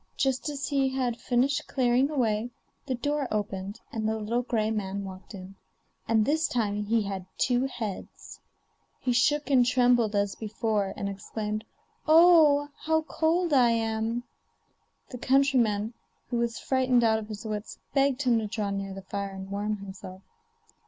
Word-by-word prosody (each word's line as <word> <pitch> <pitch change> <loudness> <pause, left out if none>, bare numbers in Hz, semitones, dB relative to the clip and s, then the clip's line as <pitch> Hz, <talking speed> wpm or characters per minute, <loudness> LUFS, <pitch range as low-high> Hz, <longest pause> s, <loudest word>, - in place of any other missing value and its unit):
Just 265 +1 0
as 285 -1 -4
he 275 -2 +2
had 250 -3 -2
finished 260 +3 +1
clearing 255 +1 +2
away, 235 -5 0 0.4
the 260 - 0
door 290 +2 -1
opened 200 0 -4
and 220 -1 -1
the 220 - -1
little 225 +3 -1
gray 220 -3 -1
man 200 -2 -3
walked 190 +2 -9
in, 190 0 -10 0.5
and 220 -1 +3
this 315 +4 +2
time 210 -3 -1
he 225 +1 +2
had 195 -2 -5
two 250 +1 +2
heads. 225 -7 -7 0.6
He 250 - 0
shook 295 +4 +2
and 255 -2 +6
trembled 245 -3 +3
as 200 -1 +1
before, 215 -2 -2
and 200 - -3
exclaimed: 210 +2 -4 0.4
'Oh! 310 -3 +6
how 320 0 +1
cold 325 +1 0
I 250 -3 +5
am.' 225 +1 -1 0.9
The 250 - -7
countryman, 245 -6 +2 0.4
who 240 - 0
was 235 -1 -1
frightened 255 -2 +2
out 220 -1 +3
of 215 - -8
his 215 +1 -7
wits, 210 -1 -5 0.2
begged 275 0 +2
him 240 -3 +3
to 215 - -3
draw 210 -1 -2
near 195 -1 -4
the 195 - -8
fire 200 +1 -4
and 195 0 -8
warm 210 +1 -2
himself. 190 -1 -10
230 Hz, 160 wpm, -27 LUFS, 205-265 Hz, 0.9 s, and